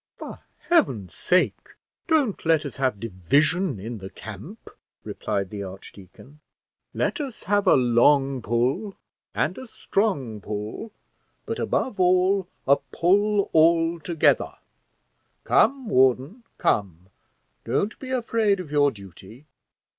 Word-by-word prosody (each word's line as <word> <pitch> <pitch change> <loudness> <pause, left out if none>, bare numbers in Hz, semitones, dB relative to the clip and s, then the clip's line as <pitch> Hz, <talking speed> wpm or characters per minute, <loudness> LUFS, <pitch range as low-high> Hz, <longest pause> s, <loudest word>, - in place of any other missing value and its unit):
"For - - -9 0.3
heaven's 125 - +2
sake, 180 +1 0 0.3
don't 295 - +1
let 160 -2 +2
us 140 - -7
have 130 -6 0
division 135 - 0
in 115 +3 -6
the 95 0 -8
camp," - - -11 0.3
replied 100 -2 -3
the 105 -1 -6
archdeacon: 95 +8 -12 0.5
"let 345 - -1
us 270 -5 -7
have 205 0 +1
a - - +7
long 135 +2 +3
pull 125 - -1 0.4
and 180 - -1
a 260 - -9
strong 145 - -2
pull, 105 - -6 0.5
but - - -4
above 250 -7 -1
all 185 +1 +3 0.2
a 140 +1 +5
pull 200 +3 +2
all 165 +1 +3
together; 165 0 +1 0.9
come, 270 -3 +2
warden, 130 - +2
come; 95 -2 -1 0.5
don't 170 - -2
be 260 - -8
afraid 230 -5 +1
of 170 -5 -8
your 145 -1 +4
duty." 100 - -13
150 Hz, 120 wpm, -24 LUFS, -, 0.9 s, a